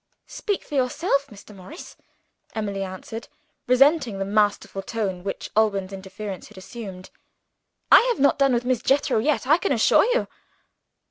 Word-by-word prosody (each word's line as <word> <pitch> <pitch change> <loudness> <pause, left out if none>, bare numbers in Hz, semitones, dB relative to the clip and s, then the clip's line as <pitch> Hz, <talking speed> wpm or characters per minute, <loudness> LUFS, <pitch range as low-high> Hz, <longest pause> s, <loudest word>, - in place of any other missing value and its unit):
"Speak 410 -3 -3
for - - -13
yourself, 280 +2 0
Mr. 210 -3 -14
Morris," 195 - -11 0.6
Emily 200 -3 -3
answered, 195 +4 -7 0.4
resenting 260 -3 +3
the 195 - -2
masterful 205 -1 0
tone 195 -4 -3
which 195 - -5
Alban's 200 -3 +1
interference 195 0 -7
had - - -17
assumed. 190 -2 -9 0.8
"I - - +10
have 475 - -1
not 280 +1 +3
done 275 -2 +4
with 240 +1 -1
Miss 250 -2 0
Jethro 275 -2 +2
yet, 255 0 0
I 305 +6 +4
can 395 - -1
assure 230 -5 +4
you." - - +1
225 Hz, 150 wpm, -24 LUFS, 195-275 Hz, 0.8 s, I